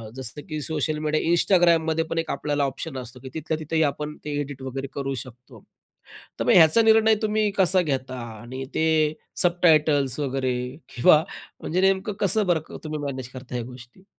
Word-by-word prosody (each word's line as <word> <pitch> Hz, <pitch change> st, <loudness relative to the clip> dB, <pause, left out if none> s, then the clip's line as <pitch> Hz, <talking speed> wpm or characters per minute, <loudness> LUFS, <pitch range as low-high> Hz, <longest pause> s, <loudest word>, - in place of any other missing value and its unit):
जसं 130 Hz, +2 st, -6 dB
की 155 Hz, -1 st, -3 dB
social 155 Hz, +1 st, -2 dB
media 155 Hz, +2 st, +1 dB
Instagramमध्ये 170 Hz, -3 st, +3 dB
पण 165 Hz, -, -3 dB
एक 165 Hz, -, -1 dB
आपल्याला 145 Hz, -1 st, -1 dB
ऑप्शन 135 Hz, +1 st, -4 dB
असतो, 125 Hz, 0 st, -8 dB
की 130 Hz, +1 st, -9 dB
तिथल्या 160 Hz, 0 st, -3 dB
तिथंही 160 Hz, +1 st, -1 dB
आपण 150 Hz, +1 st, -2 dB
ते 150 Hz, -, -4 dB
एडिट 140 Hz, -2 st, -5 dB
वगैरे 135 Hz, +1 st, -5 dB
करू 135 Hz, -1 st, -3 dB
शकतो. 125 Hz, -1 st, -16 dB, 0.8 s
तर -, -, -1 dB
मग -, -, +4 dB
ह्याचा 165 Hz, +6 st, +7 dB
निर्णय 220 Hz, 0 st, +5 dB
तुम्ही 215 Hz, -1 st, +1 dB
कसा 185 Hz, 0 st, +4 dB
घेता 130 Hz, -4 st, -3 dB, 0.2 s
आणि 130 Hz, +3 st, -7 dB
ते 160 Hz, -, +2 dB, 0.6 s
सबटायटल्स 155 Hz, -6 st, +3 dB
वगैरे 130 Hz, -3 st, -1 dB, 0.4 s
किंवा 150 Hz, +6 st, +5 dB, 0.4 s
म्हणजे 180 Hz, +3 st, -1 dB
नेमकं 195 Hz, +2 st, +2 dB
कसं 205 Hz, +1 st, +2 dB
बर 175 Hz, -3 st, +3 dB, 0.2 s
तुम्ही 155 Hz, -1 st, -4 dB
मॅनेज 130 Hz, -3 st, -4 dB
करता 130 Hz, -1 st, -8 dB
ह्या 120 Hz, -, -2 dB
गोष्टी? 125 Hz, +8 st, -13 dB
150 Hz, 170 wpm, -24 LUFS, 130-170 Hz, 0.8 s, ह्याचा